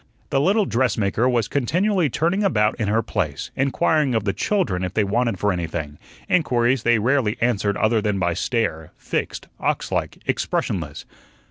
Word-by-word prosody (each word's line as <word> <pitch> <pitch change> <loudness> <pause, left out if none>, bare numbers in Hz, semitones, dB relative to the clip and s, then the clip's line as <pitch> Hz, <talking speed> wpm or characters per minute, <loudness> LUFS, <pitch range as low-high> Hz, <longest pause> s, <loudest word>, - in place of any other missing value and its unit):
The 135 - +2
little 200 +6 +3
dressmaker 115 - +1
was 120 -4 +1
continually 175 - +1
turning 170 - 0
about 105 - +2
in 110 - 0
her 110 +2 +1
place, 80 -9 -3
inquiring 140 0 +1
of 110 - +1
the 100 -1 0
children 95 - 0
if 90 0 -4
they 110 - +3
wanted 115 +1 0
for 105 0 +1
anything; 80 -4 -4 0.3
inquiries 130 -7 +2
they 120 0 +3
rarely 115 -1 +1
answered 105 -4 +1
other 110 +1 +2
than 105 -2 0
by 90 -2 0
stare, 85 -5 -2
fixed, - - -4
ox - - -1
like, - - -2
expressionless. 75 -6 -2
115 Hz, 160 wpm, -22 LUFS, 100-135 Hz, 0.3 s, little